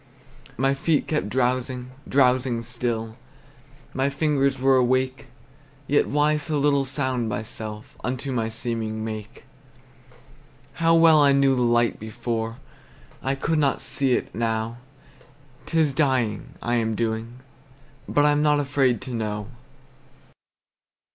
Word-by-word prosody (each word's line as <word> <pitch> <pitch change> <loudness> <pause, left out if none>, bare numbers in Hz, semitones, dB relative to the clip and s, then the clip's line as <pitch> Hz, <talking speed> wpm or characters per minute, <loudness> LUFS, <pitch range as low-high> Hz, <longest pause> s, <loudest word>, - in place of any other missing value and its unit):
My 135 +3 +2
feet 145 +2 +1
kept 150 -9 -1
drowsing, 125 +1 -1 0.2
drowsing 125 -3 +2
still, 115 -2 -3 0.8
My 135 +1 +1
fingers 140 -2 +1
were 135 +1 +3
awake; 130 +1 +1 0.6
Yet 145 +2 +2
why 150 +1 +2
so 150 0 -2
little 140 -1 +2
sound 130 -4 -1
myself 105 0 -6
Unto 130 +2 -3
my 115 -3 -1
seeming 110 -1 -3
make? 110 +2 -7 1.4
How 165 0 +5
well 165 -2 +6
I 140 -1 +5
knew 135 -1 +4
the 125 - 0
light 120 -1 +2
before! 115 +1 -4 0.6
I 135 +1 -1
could 155 +3 0
not 140 -3 +2
see 135 -2 0
it - - -2
now. 115 +1 -2 0.9
'T 165 - 0
is 150 -3 +2
dying, 130 -7 0
I 120 0 +1
am 110 -1 0
doing; 115 +1 -2 0.7
but 145 - +3
I'm 150 0 +3
not 150 -1 +3
afraid 130 -5 +1
to 130 - -6
know. 105 -2 -3
130 Hz, 130 wpm, -24 LUFS, 115-140 Hz, 1.4 s, well